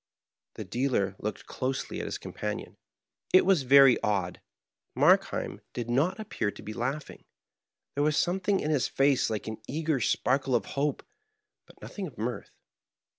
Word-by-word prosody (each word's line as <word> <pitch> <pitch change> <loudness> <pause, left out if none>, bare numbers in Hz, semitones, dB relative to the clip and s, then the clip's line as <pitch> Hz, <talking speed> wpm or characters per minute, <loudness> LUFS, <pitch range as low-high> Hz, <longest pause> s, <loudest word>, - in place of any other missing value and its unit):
The - - -5
dealer 120 -7 0
looked 105 0 -5
closely 130 +1 -3
at - - -4
his - - -3
companion. - - -5 0.6
It 185 - +7
was 190 -5 +4
very 135 0 +6
odd, 95 -4 -1 0.5
Markheim - - +2
did 120 -1 -4
not 160 - +1
appear 205 - -2
to - - -10
be 110 - -6
laughing; 130 +6 -4 0.7
there 145 - 0
was 150 0 +2
something 190 +2 +1
in 155 - -1
his 145 -5 +2
face 135 -2 +2
like 110 -2 -3
an 110 0 -6
eager 155 0 -1
sparkle 130 +2 +1
of 120 - +1
hope, 140 0 -1 0.6
but - - -19
nothing 195 -3 -6
of 145 - -13
mirth. 115 -1 -4
135 Hz, 155 wpm, -28 LUFS, 120-150 Hz, 0.7 s, It